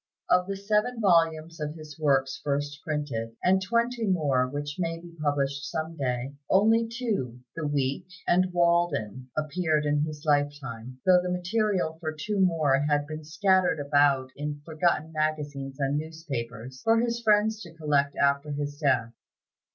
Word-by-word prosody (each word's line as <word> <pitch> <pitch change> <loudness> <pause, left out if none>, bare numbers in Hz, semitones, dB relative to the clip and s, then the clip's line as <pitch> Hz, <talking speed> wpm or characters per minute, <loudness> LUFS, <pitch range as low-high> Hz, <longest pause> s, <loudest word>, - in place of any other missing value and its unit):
Of 180 0 +4
the 195 - -2
seven 210 +4 0
volumes 165 -4 +2
of 150 0 -4
his 155 -1 -11
works 135 -3 +1
first 145 0 -2
printed, 130 -7 -3
and 190 +1 +4
twenty 235 +3 0
more 145 -9 +2
which 145 +2 -5
may 165 -1 -1
be 170 0 -13
published 140 -1 -1
some 160 0 -3
day, 130 -1 -2 0.2
only 225 +4 +4
two, 210 - -3
"The 155 -3 -2
Week" 140 +4 -1 0.2
and 185 +1 +3
"Walden," 170 - +1
appeared 155 0 0
in 145 0 +2
his 155 -1 -6
lifetime, 145 -5 -1
though 180 -1 +6
the 180 - -3
material 180 -2 0
for 160 -2 -3
two 195 +7 -3
more 160 -7 +3
had 145 -1 +2
been 155 +1 -7
scattered 185 +2 +2
about 140 -2 +3
in 145 0 -4
forgotten 160 0 0
magazines 145 -3 -2
and 140 +1 +1
newspapers, 130 -6 -6
for 225 0 +3
his 235 0 -1
friends 215 0 +3
to 170 -4 -10
collect 145 -3 +1
after 140 +1 +2
his 145 0 -4
death. 120 -6 +1
155 Hz, 155 wpm, -27 LUFS, 140-180 Hz, 0.2 s, though